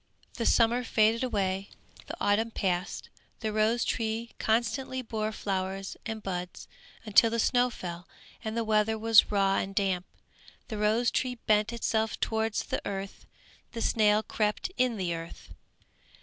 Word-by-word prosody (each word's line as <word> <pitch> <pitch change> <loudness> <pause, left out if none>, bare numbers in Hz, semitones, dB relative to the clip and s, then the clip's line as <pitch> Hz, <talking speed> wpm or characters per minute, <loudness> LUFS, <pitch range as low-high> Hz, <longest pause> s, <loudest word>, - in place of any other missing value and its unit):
The 230 - -1
summer 235 +1 +3
faded 225 +1 +2
away, 195 -5 -1 0.4
the - - -6
autumn 210 +3 +2
passed, 185 -3 -2 0.3
the 215 -2 -2
rose 220 +2 +2
tree 225 0 -2
constantly 240 +3 0
bore 220 -2 -2
flowers 195 -2 -3
and 220 -1 -5
buds, 180 -2 -5 0.4
until 220 +2 +5
the 230 - -1
snow 245 +2 +3
fell, 175 -6 -7 0.4
and 220 0 -3
the 230 - +1
weather 220 0 +2
was 225 0 +5
raw 195 -1 +2
and 195 0 -3
damp. 190 -3 0 0.6
The 215 -3 -4
rose 220 +3 +2
tree 255 -1 -1
bent 210 +1 +3
itself 220 -1 -1
towards 220 -1 0
the - - -3
earth, 195 0 -6 0.5
the 230 - -4
snail 215 -1 +3
crept 210 - -1
in 250 -3 +1
the 180 -3 -1
earth. 165 0 -8
215 Hz, 150 wpm, -29 LUFS, 195-230 Hz, 0.6 s, until